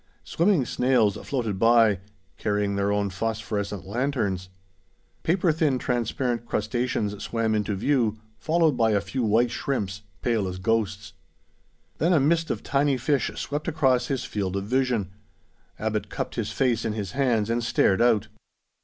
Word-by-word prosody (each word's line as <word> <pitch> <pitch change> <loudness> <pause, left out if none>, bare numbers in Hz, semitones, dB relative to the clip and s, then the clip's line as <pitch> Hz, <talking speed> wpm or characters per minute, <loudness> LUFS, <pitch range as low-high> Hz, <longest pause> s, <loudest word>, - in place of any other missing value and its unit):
Swimming 170 -5 +2
snails 120 -4 +2
floated 115 -8 -3
by, 115 -3 +5 0.4
carrying 105 -1 -1
their 100 0 +1
own 100 -1 0
phosphorescent 105 -1 -3
lanterns. 105 -5 -1 0.7
Paper 175 0 +2
thin 150 -4 +1
transparent 120 -1 -1
crustaceans 110 -2 -1
swam 115 0 -1
into 105 -1 0
view, 115 0 +1 0.2
followed 165 0 +3
by 115 -2 +2
a 100 - +3
few 130 +6 -4
white 115 +2 +2
shrimps, 100 -8 -2 0.2
pale 115 -5 +1
as 90 0 -5
ghosts. 100 -1 -1 0.9
Then 170 +4 +3
a 160 - +5
mist 165 +4 +2
of - - -3
tiny 140 -2 +1
fish 140 +2 +1
swept 145 +3 -4
across 135 -6 +2
his 135 -3 -2
field 95 -3 -3
of 100 - -1
vision. 120 -4 0 0.7
Abbot - - -2
cupped - - -4
his - - -3
face 120 -4 +1
in 110 - -1
his 100 -4 -4
hands, 120 -6 +1
and 120 +1 0
stared 115 -3 +2
out. 110 -3 +3
115 Hz, 150 wpm, -25 LUFS, 105-135 Hz, 0.9 s, by